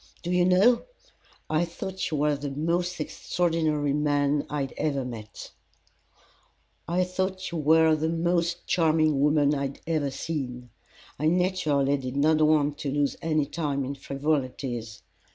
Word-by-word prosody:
"Do 175 - -3
you 180 0 +3
know, 195 +7 +5 0.7
I 155 +2 +1
thought 185 +2 -4
you 155 - -2
were 150 0 +2
the 145 0 -5
most 170 +5 -1
extraordinary 155 -3 0
man 145 -1 +1
I 150 0 -2
had 135 - -4
ever 140 -4 -1
met." 110 -4 -8 1.4
"I 175 +3 +1
thought 185 +1 -3
you 170 - -3
were 160 +1 +5
the 155 +1 -1
most 170 +1 0
charming 155 -3 +2
woman 150 0 +3
I 140 - -1
had 135 - -11
ever 155 -4 0
seen. 125 -5 -5 0.5
I 155 - +1
naturally 160 -6 +2
did 130 -1 -6
not 155 +2 +3
want 150 -1 +3
to 145 - -3
lose 145 0 0
any 155 -3 +1
time 140 -3 -2
in 135 - -3
frivolities. 135 -5 -3
150 Hz, 150 wpm, -26 LUFS, 140-170 Hz, 1.4 s, know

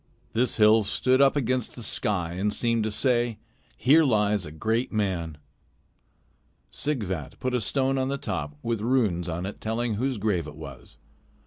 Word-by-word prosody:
This 120 +1 +1
hill 110 +1 +6
stood 130 +5 +2
up 140 0 +5
against 130 -3 0
the 120 - -5
sky 100 -6 +1
and 100 +4 -1
seemed 115 0 +1
to - - 0
say: 120 0 +1 0.4
"Here 150 +6 +5
lies 105 - +1
a - - -9
great 110 +10 -1
man." 90 -7 -2 1.3
Sighvat 100 - -3
put 130 0 -2
a 125 - +1
stone 135 +5 +1
on 130 - 0
the 140 +1 -2
top, 80 - -4
with 115 -2 -1
runes 105 -8 +1
on 85 +2 -3
it 100 - -7
telling 115 +1 -1
whose 125 +4 -1
grave 95 -6 -1
it 75 - -9
was. 80 +1 -10
110 Hz, 170 wpm, -26 LUFS, 95-125 Hz, 1.3 s, hill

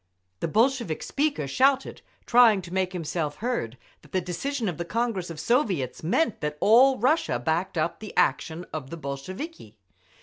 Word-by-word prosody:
The - - -1
Bolshevik 230 - +1
speaker 285 - -1
shouted, 270 - +2 0.2
trying 230 -5 +5
to 175 0 -9
make 185 -1 0
himself 165 -4 -3
heard, 215 - -3 0.2
that - - -21
the 185 - +2
decision 220 +8 -3
of 175 -4 -3
the - - -1
Congress 220 -2 -2
of 165 -2 -7
Soviets 190 - 0
meant 220 - 0
that 150 -1 -3
all 255 +5 +6
Russia 255 - +2
backed 160 +8 -1
up 155 +2 -1
the 215 - -9
action 165 +2 +1
of 145 -4 -5
the 170 - -6
Bolsheviki. 140 - -7
185 Hz, 165 wpm, -26 LUFS, 155-245 Hz, 0.2 s, all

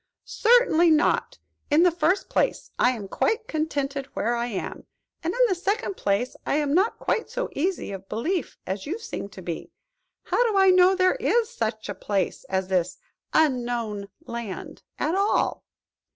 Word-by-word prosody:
"Certainly 440 -8 +4
not. 310 -1 +2 0.3
In 305 +3 +5
the 360 - +5
first 350 +4 +1
place, - - 0
I 245 - +5
am 210 -5 -6
quite 445 - 0
contented 285 -3 -2
where 235 +3 0
I 235 0 -1
am; 210 -6 -5 0.4
and, 330 - 0
in - - -5
the 395 - +1
second 395 +3 -1
place, 205 - 0
I - - 0
am 290 -1 +1
not 385 +7 +2
quite 450 - -1
so - - -3
easy 355 - -2
of 195 0 -8
belief 330 - -2
as 190 +4 -4
you 360 +8 -2
seem 445 - -6
to 190 -2 -11
be. 170 -2 -5 0.5
How 485 - +2
do 400 - 0
I 385 -1 +6
know 365 +1 +6
there 370 +5 +3
is 475 -2 +1
such 220 - -3
a 205 - -3
place 195 0 -2
as 190 -1 -1
this 180 -2 0 0.3
Unknown 240 -8 0 0.2
Land 235 -7 -6 0.2
at 310 - 0
all?" 395 +2 +1
300 Hz, 170 wpm, -25 LUFS, -, 0.5 s, I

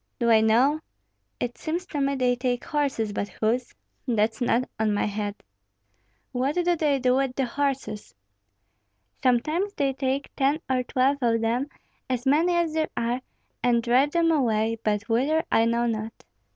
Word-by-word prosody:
"Do 235 -2 +2
I 220 -1 +6
know? 245 +8 +3 0.6
It 245 0 -4
seems 340 +3 -3
to 295 -6 -3
me 275 0 +1
they 250 -2 +2
take 245 -1 -2
horses, 275 -8 -1
but 205 0 -3
whose, 240 +3 0 0.4
that's 220 -1 +1
not 245 +1 +1
on 215 -1 +1
my - - +1
head." 205 0 -3 1.0
"What 265 +4 -1
do 355 - +1
they 300 -4 +1
do 255 -1 +2
with 270 -2 0
the 270 - 0
horses?" 265 -5 -3 1.1
"Sometimes 310 +11 +1
they 275 -2 0
take 270 +1 -2
ten 280 +3 +2
or 260 -1 +1
twelve 260 +3 +1
of 230 -2 +2
them, 235 +5 0 0.4
as 250 0 -2
many 320 +6 +3
as 340 -2 +1
there 315 -1 0
are, 240 +2 -1 0.4
and 235 -1 +2
drive 255 +5 +3
them 335 +1 +2
away, 225 -6 +1
but 210 +1 0
whither 275 +8 +2
I 225 - +4
know 235 +1 +1
not." 220 -1 -4
250 Hz, 165 wpm, -25 LUFS, 230-280 Hz, 1.1 s, I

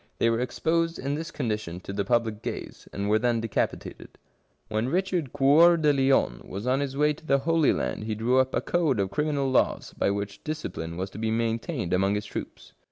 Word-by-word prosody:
They 115 - +3
were 115 - 0
exposed 165 +6 0
in 140 +1 -2
this 160 +3 -4
condition 105 - -3
to 100 - -7
the 100 0 -1
public 115 -1 0
gaze, - - -6
and 100 0 -3
were 110 +1 +3
then 120 0 +1
decapitated. 115 -2 -3 0.5
When 110 +3 -1
Richard 180 -4 -1
Cceur 150 +5 +6
de 150 -2 +3
Lion 135 0 +2
was 100 +4 -7
on 130 +2 +2
his 140 -1 -3
way 150 +1 +3
to 155 - -16
the 140 -3 +3
Holy 165 +2 +2
Land 65 +11 -2
he 110 -1 -2
drew 120 +4 +2
up 130 0 +1
a - - +1
code 160 -10 +1
of 95 -1 0
criminal 145 +1 0
laws 130 - +1
by - - +1
which 100 0 -4
discipline 85 - -5
was 95 +1 -4
to - - -9
be 110 0 -1
maintained 115 - -1
among 95 +2 +2
his 105 0 -3
troops. - - -8
125 Hz, 210 wpm, -26 LUFS, 105-150 Hz, 0.5 s, Cceur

